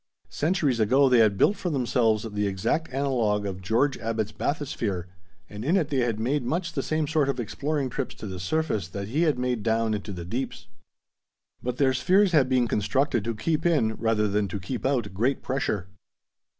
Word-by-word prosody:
Centuries 150 -6 +1
ago 130 +6 +4
they 125 -2 +5
had 105 -3 +4
built 200 - +4
for 180 - -3
themselves 120 -6 +1
the 105 0 0
exact 100 - -1
analog 120 -7 0
of 95 -2 -4
George 115 +9 +1
Abbot's 110 -2 -2
bathysphere, 110 - -2 0.4
and 105 +1 -8
in 165 +9 +3
it 160 -6 0
they 140 - 0
had 115 -3 0
made 135 +6 0
much 165 +7 -2
the 135 - -1
same 155 +2 -1
sort 155 -3 +1
of 140 - -1
exploring 140 +5 -2
trips 130 +1 -4
to - - -9
the 95 -2 -6
surface 110 - -1
that 100 +3 -6
he 145 +8 0
had 145 - 0
made 125 -2 -1
down 115 0 +1
into 105 0 -4
the 90 -3 -6
deeps. 120 +9 -4 1.0
But 125 0 -3
their 135 -2 +3
spheres 185 +9 +3
had 140 -6 +4
been 125 -2 +3
constructed 120 +2 +1
to 115 -1 -2
keep 155 +8 -1
in, 150 -11 +2
rather 110 -1 +1
than 105 0 0
to 95 +2 -5
keep 115 +8 -3
out, 130 -8 -1
great 120 +8 0
pressure. 130 -8 -1
125 Hz, 195 wpm, -26 LUFS, 105-140 Hz, 1.0 s, they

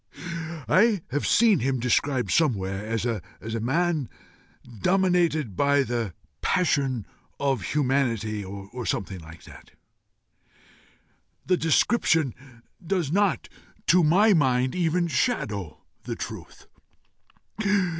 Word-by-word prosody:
I 200 - +3
have 145 +3 -1
seen 220 -3 +4
him 130 +1 0
described 125 +2 +1
somewhere 100 -10 +1
as 115 0 -2
a 115 -5 -1 0.4
man 155 +2 0 0.7
dominated 175 - +2
by 140 +5 +3
the 115 -7 -3 0.3
passion 140 - +1 0.3
of 135 -5 0
humanity 115 -5 0
or 100 +5 -7
something 95 0 -3
like 80 0 -13
that. - - -14 1.8
The 185 - +3
description 160 - +2 0.5
does 175 -4 -1
not, 200 +1 +1 0.4
to 180 0 +5
my 200 +8 +5
mind, 130 -5 +2
even 175 0 +1
shadow 105 - -2 0.2
the - - -3
truth. - - -8
140 Hz, 100 wpm, -25 LUFS, 115-175 Hz, 1.8 s, to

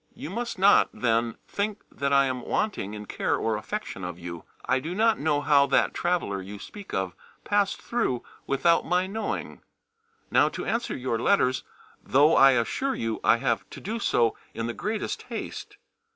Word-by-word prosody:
You 160 - -7
must 235 +2 -3
not, 195 +2 +5
then, 115 -1 0
think 205 +1 -3
that 140 0 -2
I 140 0 +5
am 130 -1 -2
wanting 120 - -2
in 105 0 -7
care - - -1
or 110 -1 0
affection 205 - -5
for 90 -1 -5
you. 85 -1 -7 0.2
I 130 - +2
do 160 +7 -5
not 225 +1 +3
know 145 -1 +1
how 140 -1 +4
that 135 - +2
traveller 170 - -1
you 100 +2 -8
speak 195 - -10
of 95 -2 -1 0.3
passed 205 -1 +1
through 225 - -1 0.2
without 155 +5 +3
my 180 +2 +1
knowing. 215 +4 -4 0.7
Now - - +5
to - - -6
answer 230 +1 -1
your 125 -3 -1
letters, 125 +2 +2 0.4
though 145 +4 +4
I 135 0 +7
assure 195 - 0
you 115 -1 -2
I - - +5
have - - -1
to - - -9
do 220 +4 -4
so 115 - +2 0.2
in 115 - -2
the 120 - -2
greatest 215 - -3
haste. - - -6
140 Hz, 180 wpm, -26 LUFS, -, 0.7 s, I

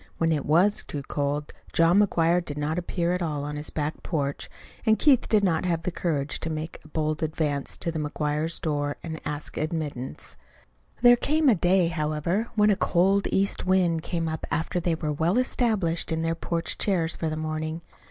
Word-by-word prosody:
When 165 0 +1
it 150 -3 -1
was 180 +7 +3
too 145 -2 -6
cold, 145 +1 -2 0.2
John 165 +4 +5
McGuire 175 -3 +3
did 145 -3 -6
not 155 +3 -1
appear 175 0 -1
at 180 - -2
all 150 -4 -2
on 150 0 -4
his 150 +1 -4
back 150 0 -3
porch, 140 -4 -3 0.3
and 220 -2 +4
Keith 275 -5 +4
did 215 -2 +3
not 165 -5 +2
have 165 -2 0
the 180 - -1
courage 150 -5 -2
to 165 - -3
make 160 +1 -5
a - - -15
bold 155 0 -2
advance 150 -3 -1
to 170 - -1
the 160 - -3
McGuire 150 +2 -1
door 145 -2 -1
and 160 -2 -6
ask 150 0 -4
admittance. 155 - -4 0.7
There 245 0 +9
came 300 +4 +2
a - - +7
day, 180 -1 +3
however, 160 +6 -1
when 210 -1 +4
a - - +3
cold 195 +2 +2
east 195 -1 0
wind 180 -3 +2
came 165 0 -2
up 160 -1 -4
after 165 +2 -1
they 170 -1 0
were 155 -2 -2
well 165 +8 +1
established 215 -11 +1
in 160 0 -1
their 165 0 +1
porch 165 0 -2
chairs 175 -5 +1
for 160 - -2
the 155 - -3
morning. 155 +1 -3
165 Hz, 195 wpm, -26 LUFS, 155-180 Hz, 0.7 s, There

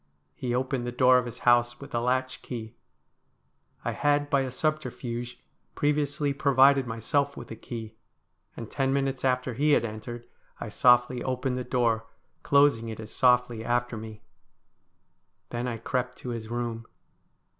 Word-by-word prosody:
He 120 -1 -3
opened 130 -1 -1
the - - -2
door 125 +1 +5
of 125 - -4
his 120 0 -8
house 120 0 +4
with 140 +1 -11
a 120 - +1
latch 130 +2 -1
key. 110 -3 -7 1.1
I - - 0
had 145 0 +1
by 140 - +4
a 130 - -2
subterfuge 125 -4 -3 0.4
previously 145 -1 0
provided 140 -1 +4
myself 140 +5 -1
with 120 - -9
a - - -5
key, 115 -1 -7 0.6
and 115 -2 -7
ten 135 -1 0
minutes 135 -1 -1
after 125 -1 +1
he 145 +5 +2
had - - +3
entered 115 +2 -7 0.4
I - - -5
softly 125 0 +4
opened 130 0 -1
the - - -3
door, 115 -3 0 0.3
closing 140 -5 +3
it 110 - -7
as 110 -1 -7
softly 125 -3 +3
after 120 0 0
me. 110 -1 -9 1.3
Then 120 +1 -2
I 115 -2 -3
crept 125 +2 -2
to 125 - -7
his 115 -2 -5
room. 115 -1 -4
125 Hz, 155 wpm, -27 LUFS, 120-135 Hz, 1.3 s, door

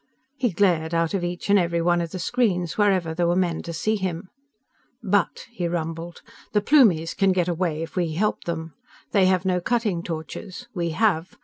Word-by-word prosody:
_" - - -46 0.3
He 255 -3 0
glared 170 -4 +1
out 165 +1 +1
of 190 -3 -1
each 175 0 -4
and 200 0 +5
every 170 -1 0
one 175 +1 +2
of 170 - -3
the 185 - -6
screens, 185 -4 0
wherever 190 -6 +2
there 170 +1 +1
were 175 - +2
men 175 -3 0
to 170 - -6
see 215 +7 0
him. 185 -2 -4 0.7
"But," 200 -2 0
he 180 -7 -2
rumbled, 165 0 -4 0.3
"_the 210 - +4
Plumies 190 - +4
can 195 -1 +3
get 180 -2 +1
away 170 -2 -1
if 165 - -9
we 175 -4 0
help 210 +6 -1
them. 160 -2 -4 0.4
They 195 -3 +4
have 185 0 +2
no 180 -1 +1
cutting 215 -4 0
torches. 175 +7 -7
We 170 -4 -1
have. 165 0 0
175 Hz, 200 wpm, -24 LUFS, 165-195 Hz, 0.7 s, and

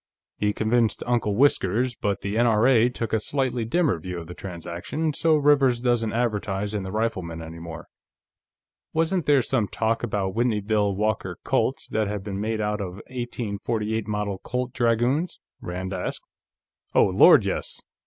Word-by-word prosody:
"He 105 0 +1
convinced 110 +1 +1
Uncle 120 -4 +1
Whiskers, 125 -2 +2
but 100 -3 -2
the 100 +1 -3
N.R.A. 120 +1 +4
took 115 -3 -4
a 110 - +3
slightly 125 -1 -1
dimmer 135 - +1
view 90 +2 -6
of 85 - -6
the 85 - -8
transaction, 90 - -4
so 160 +2 +3
Rivers 140 -4 +4
doesn't 120 -3 +1
advertise 105 -3 -1
in 105 - -1
the 95 0 -6
Rifleman 95 -7 -2
any 80 0 -8
more." 85 -1 -8 1.1
"Wasn't 165 +2 0
there 140 -3 +5
some 115 -4 0
talk 115 +4 -1
about 100 -5 -1
Whitneyville 105 -3 +1
Walker 100 -3 -1
Colts - - 0
that 110 -1 0
had 105 -1 -4
been 100 -1 -4
made 110 +1 -1
out 105 0 -1
of 90 -2 -5 0.2
1848 110 -3 -3
Model 105 -2 -2
Colt 125 +3 -3
Dragoons?" 125 +7 +1 0.2
Rand 95 +2 -4
asked. 90 - -4 0.7
"Oh - - +6
Lord, - - +6
yes! - - -3
110 Hz, 155 wpm, -25 LUFS, 100-120 Hz, 1.1 s, Oh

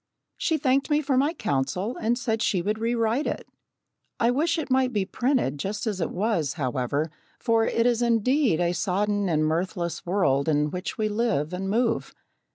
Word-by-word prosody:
She 320 - 0
thanked 275 0 +1
me 295 0 +3
for 275 -1 +1
my 280 +4 +3
counsel 185 - -2
and 230 +2 0
said 225 -3 -1
she 185 -6 +1
would 210 +3 -1
rewrite 230 +3 0
it. - - -4 0.7
I 235 +1 +3
wish 330 +6 +1
it 310 -4 -4
might 260 -1 +3
be 205 -5 0
printed 240 - 0
just 205 +8 -3
as 205 -5 -2
it 165 - 0
was, 180 - 0
however, 140 +2 -1 0.3
for 230 -2 +2
it 230 - +1
is 245 -1 +2
indeed 235 - +2
a 175 0 +1
sodden 205 +1 0
and 155 -2 +2
mirthless 170 +2 -2
world 160 -6 +1
in 150 -1 +1
which 180 +1 -4
we 215 -1 +1
live 210 -8 0
and 190 +1 -3
move. 230 +2 0
215 Hz, 180 wpm, -26 LUFS, 175-240 Hz, 0.7 s, me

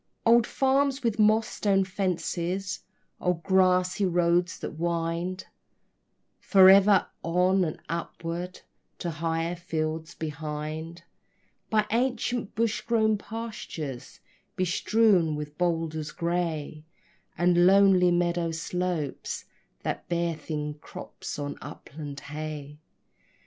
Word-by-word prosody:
Old 235 0 +5
farms 270 0 +1
with 230 -2 0
mossed 215 +1 +4
stone 195 -2 +3
fences, 185 0 -2 0.4
old 180 -2 -1
grassy 185 0 +3
roads 175 -1 +2
that - - -5
wind 170 +2 -2 0.9
Forever 195 0 +7 0.2
on 180 +3 +2
and 155 -3 -3
upward 170 +1 -5 0.4
to 170 - -3
higher 165 +2 -1
fields 160 -1 -3
behind, 155 +2 -5 0.7
By 215 -1 +3
ancient 245 -2 0
bush 220 -1 0
grown 220 -2 +2
pastures, 205 - -7 0.3
bestrewn 185 -2 +3
with 150 0 -6
boulders 165 -3 -1
gray, 165 -3 -2 0.5
And 175 +1 +4
lonely 190 -2 +6
meadow 175 -1 +1
slopes 165 -2 -3 0.4
that - - -4
bear 170 -1 0
thin 150 -1 -4
crops - - -8
of 145 -1 -4
upland 145 -1 -8
hay. 150 0 -6
175 Hz, 100 wpm, -27 LUFS, 160-195 Hz, 0.9 s, Forever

